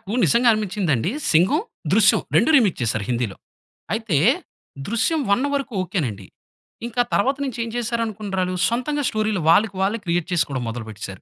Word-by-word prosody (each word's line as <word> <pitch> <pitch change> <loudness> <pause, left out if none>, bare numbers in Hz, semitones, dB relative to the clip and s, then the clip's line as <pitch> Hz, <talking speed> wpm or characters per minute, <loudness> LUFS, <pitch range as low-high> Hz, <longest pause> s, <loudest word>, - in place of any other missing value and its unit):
నాకు 195 - -10
నిజంగా 235 +1 +3
అనిపించిందండి 190 - -1 0.2
'సింగం', 190 - +3 0.3
'దృశ్యం' - - +4
2 - - +4
రీమేక్ 215 -9 +3
చేసారు 110 -2 -1
హిందీలో. 120 -5 -2 0.6
అయితే, 220 -8 0 0.7
దృశ్యం 235 +9 0
1 200 +7 +2
వరకు 275 -4 -2
ఒకెనండి. 125 - -3 0.6
ఇంకా 240 +1 0
తర్వాత 270 +7 +2
నుంచి 255 -4 -4
ఏం 230 - -5
చేసారు 235 -1 -1
అనుకున్నరాలు 195 -4 -3
సొంతంగా 270 +5 -1
స్టోరీలు 215 -3 -1
వాళ్ళకి 200 +4 +4
వాళ్ళే 205 +4 +1
క్రియేట్ 170 -1 0
చేసుకోవడం 140 -7 0
మొదలు 115 0 -5
పెట్టేసారు. 100 -2 -8
200 Hz, 150 wpm, -22 LUFS, 160-235 Hz, 0.7 s, దృశ్యం